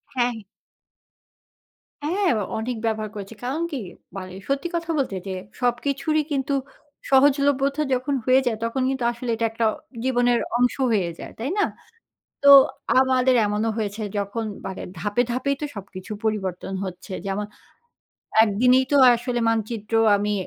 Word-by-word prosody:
হ্যাঁ। 245 Hz, -1 st, +1 dB, 1.7 s
হ্যাঁ, 365 Hz, +6 st, +1 dB
অ -, -, -1 dB
অনেক 235 Hz, +3 st, -2 dB
ব্যবহার 220 Hz, -1 st, -1 dB
করেছে। 200 Hz, +2 st, -7 dB
কারণ 270 Hz, +6 st, -2 dB
কি 285 Hz, -, -3 dB, 0.4 s
মানে 185 Hz, -1 st, -7 dB
সত্যি 275 Hz, +5 st, -1 dB
কথা 335 Hz, 0 st, -3 dB
বলতে 260 Hz, -9 st, -1 dB
যে 190 Hz, -, -3 dB, 0.3 s
সবকিছুরই 280 Hz, +5 st, 0 dB
কিন্তু 280 Hz, 0 st, 0 dB, 0.6 s
সহজলভ্যতা 280 Hz, +1 st, +3 dB
যখন 255 Hz, +3 st, -1 dB
হয়ে 255 Hz, +1 st, +5 dB
যায়, 225 Hz, -3 st, 0 dB
তখন 255 Hz, +3 st, -2 dB
কিন্তু 265 Hz, -2 st, -2 dB
আসলে 240 Hz, +1 st, -6 dB
এটা 230 Hz, 0 st, -1 dB
একটা 225 Hz, 0 st, -1 dB, 0.4 s
জীবনের 245 Hz, -2 st, +2 dB, 0.2 s
অংশ 245 Hz, 0 st, +2 dB, 0.2 s
হয়ে 185 Hz, -5 st, +1 dB
যায়, -, -, -8 dB
তাই 240 Hz, +5 st, -2 dB
না? -, -, +4 dB, 0.8 s
তো 280 Hz, -, +9 dB, 0.5 s
আমাদের 260 Hz, -1 st, +3 dB
এমনও 210 Hz, +2 st, 0 dB
হয়েছে 210 Hz, 0 st, -3 dB, 0.2 s
যখন 205 Hz, +3 st, -3 dB, 0.2 s
মানে 190 Hz, 0 st, -5 dB, 0.2 s
ধাপে, 205 Hz, +3 st, +1 dB
ধাপেই 280 Hz, +3 st, 0 dB
তো 300 Hz, -, -2 dB
সবকিছু 195 Hz, +1 st, -8 dB
পরিবর্তন 190 Hz, -4 st, -2 dB
হচ্ছে। 185 Hz, +1 st, -8 dB
যেমন 200 Hz, +2 st, -2 dB, 1.0 s
একদিনেই 250 Hz, +5 st, +3 dB
তো 285 Hz, -, +5 dB, 0.2 s
আসলে 240 Hz, +1 st, -2 dB
মানচিত্র 225 Hz, -1 st, -3 dB, 0.2 s
আমি 210 Hz, +1 st, -1 dB
240 Hz, 140 wpm, -23 LUFS, 210-270 Hz, 1.7 s, তো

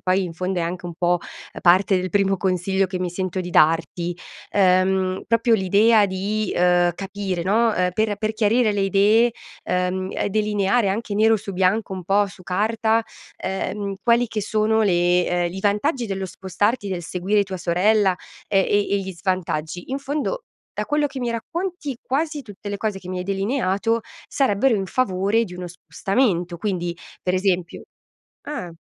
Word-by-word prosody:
poi 185 Hz, +1 st, +2 dB
in 170 Hz, -2 st, -5 dB
fondo 185 Hz, +1 st, -2 dB
è 170 Hz, -, 0 dB
anche 175 Hz, +1 st, -4 dB
un 175 Hz, -, -5 dB
po' 175 Hz, +1 st, +1 dB, 0.4 s
parte 185 Hz, +2 st, +5 dB
del 185 Hz, -1 st, -3 dB
primo 195 Hz, -1 st, +2 dB
consiglio 190 Hz, +1 st, 0 dB
che 185 Hz, 0 st, -4 dB
mi 180 Hz, -, -1 dB
sento 185 Hz, +1 st, -3 dB
di 180 Hz, -, -5 dB
darti, 165 Hz, +2 st, +2 dB, 0.4 s
ehm, 185 Hz, -1 st, +2 dB
proprio 230 Hz, +1 st, +3 dB
l'idea 210 Hz, +3 st, +4 dB
di, 200 Hz, +3 st, -2 dB
uhm, 175 Hz, 0 st, +3 dB
capire, 195 Hz, -2 st, -4 dB
no, 220 Hz, +4 st, +3 dB
ehm, 180 Hz, -1 st, +1 dB
per 215 Hz, 0 st, 0 dB
per 215 Hz, 0 st, -1 dB
chiarire 220 Hz, +1 st, +2 dB
le 200 Hz, -, 0 dB
idee, 210 Hz, +5 st, +4 dB, 0.3 s
ehm, 180 Hz, +1 st, -1 dB
e -, -, -1 dB
delineare 210 Hz, 0 st, +1 dB
anche 210 Hz, +1 st, -3 dB
nero 220 Hz, +2 st, +4 dB
su 200 Hz, -, -7 dB
bianco, 190 Hz, +2 st, +1 dB
un 185 Hz, -2 st, -7 dB
po' 200 Hz, +2 st, +3 dB
su 190 Hz, -1 st, -13 dB
carta, 220 Hz, +4 st, +1 dB, 0.4 s
ehm, 200 Hz, +1 st, -3 dB
quali 235 Hz, 0 st, +3 dB
che 215 Hz, -2 st, -3 dB
sono 220 Hz, +1 st, +1 dB
le 175 Hz, -2 st, +3 dB
ehm, 175 Hz, -1 st, 0 dB
i 190 Hz, -, -5 dB
vantaggi 235 Hz, +6 st, +1 dB
dello 195 Hz, -2 st, -3 dB
spostarti, 200 Hz, +4 st, -1 dB
del 180 Hz, -2 st, -3 dB
seguire 190 Hz, +5 st, 0 dB
tua 190 Hz, -1 st, -5 dB
sorella, 190 Hz, +3 st, +2 dB, 0.3 s
e 195 Hz, -, +3 dB
e 205 Hz, 0 st, +2 dB
e -, -, +4 dB
gli 190 Hz, -1 st, -5 dB
svantaggi. 175 Hz, +1 st, -3 dB
In 270 Hz, -, -1 dB
fondo 295 Hz, -, -3 dB, 0.3 s
da -, -, -2 dB
quello 295 Hz, 0 st, +1 dB
che 270 Hz, -1 st, -7 dB
mi 240 Hz, -1 st, -1 dB
racconti, 310 Hz, -, -4 dB
quasi 295 Hz, +2 st, -1 dB
tutte 205 Hz, -2 st, -10 dB
le 200 Hz, -, -3 dB
cose 210 Hz, -2 st, -2 dB
che 180 Hz, -, -12 dB
mi 185 Hz, 0 st, -3 dB
hai -, -, -2 dB
delineato 200 Hz, +2 st, 0 dB, 0.3 s
sarebbero 265 Hz, -1 st, +2 dB
in 195 Hz, -2 st, -1 dB
favore 200 Hz, +1 st, +1 dB
di 180 Hz, -4 st, -9 dB
uno 180 Hz, 0 st, -6 dB
spostamento, 175 Hz, -, -1 dB
quindi 175 Hz, -2 st, -2 dB, 0.3 s
per 180 Hz, -, 0 dB
esempio 185 Hz, -2 st, 0 dB, 0.6 s
ah! 285 Hz, -12 st, -5 dB
195 Hz, 175 wpm, -22 LUFS, 180-220 Hz, 0.6 s, parte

